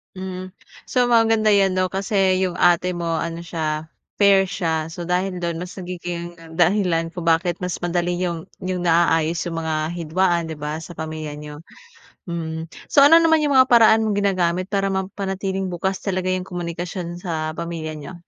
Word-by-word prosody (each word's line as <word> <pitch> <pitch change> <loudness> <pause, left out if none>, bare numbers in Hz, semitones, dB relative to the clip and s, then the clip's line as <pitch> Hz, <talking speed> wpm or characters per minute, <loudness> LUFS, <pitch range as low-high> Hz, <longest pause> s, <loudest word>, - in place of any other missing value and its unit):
Mm. 185 0 -6 0.4
So, 250 -1 +3
maganda 225 -2 +3
'yan 195 -1 +4
'no 185 0 +1
kasi 190 -1 +1
yung 180 -1 -2
ate 175 +1 +4
mo 170 -2 -2
ano 165 +1 -3
siya, 160 -2 -3 0.3
fair 200 -1 +6
siya. 165 -4 -2
So, 170 0 -6
dahil 180 +1 -1
do'n 170 -1 -2
mas 180 +2 -6
nagiging 175 -1 -6 0.2
dahilan 175 -2 +2
kung 175 - -5
bakit 170 +2 +1
mas 180 -1 -3
madali 175 0 -1
niyong 170 -3 -2 0.2
niyong 185 -1 -3
naaayos 165 -1 +2
yung 165 -1 -3
mga 160 -1 -1 0.2
hidwaan, 170 0 0
'di 150 - -7
ba, 150 +1 -3
sa 165 - -10
pamilya 155 -1 -5
n'yo, 150 +1 -9 0.7
mhm. 160 0 -4 0.2
So 280 - +5
ano 325 +4 +8
naman 320 -2 +4
yung 285 -3 +3
mga 260 - +7
paraan 225 -2 +5
mong 210 - 0
ginagamit 185 -3 +1
para 195 -1 +1
mapanatiling 190 0 -3
bukas 185 +2 -2
talaga 185 -2 -2
yung 185 0 -2
komunikasyon 175 0 -5
sa 160 -3 -3
pamilya 160 -2 -5
n'yo? 150 +5 -9
175 Hz, 170 wpm, -22 LUFS, 165-190 Hz, 0.7 s, ano